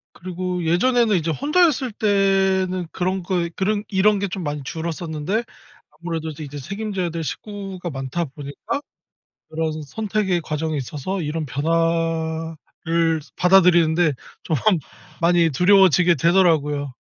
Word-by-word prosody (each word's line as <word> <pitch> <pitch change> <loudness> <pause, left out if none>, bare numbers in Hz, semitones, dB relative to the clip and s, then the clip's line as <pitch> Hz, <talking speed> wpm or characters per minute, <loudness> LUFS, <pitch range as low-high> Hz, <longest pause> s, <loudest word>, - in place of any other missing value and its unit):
그리고 180 0 -4
예전에는 220 +5 +3
이제 165 -1 -1
혼자였을 290 - +2
때는 195 -3 +1
그런 185 +1 -1
거 175 -1 -1
그런 205 +1 0
이런 205 +1 +3
게 200 0 -1
좀 185 0 -5
많이 145 -1 -3
줄었었는데 165 - -3 0.5
아무래도 160 0 -5
이제 145 -2 -7
책임져야 195 +3 -3
될 165 0 -4
식구가 195 -1 -6
많다 135 +4 -3
보니까 145 - -6 0.7
그런 160 0 -2
선택의 205 -1 -1
과정에 155 0 -2
있어서 150 +8 -4
이런 155 +1 -3
변화를 165 +2 -1 0.2
받아들이는 175 -3 +5
데 165 -4 +3 0.3
좀 160 - -1 0.7
많이 170 -1 +4
두려워지게 180 0 +5
되더라고요. 150 -4 +2
170 Hz, 300 characters per minute, -22 LUFS, 160-195 Hz, 0.7 s, 받아들이는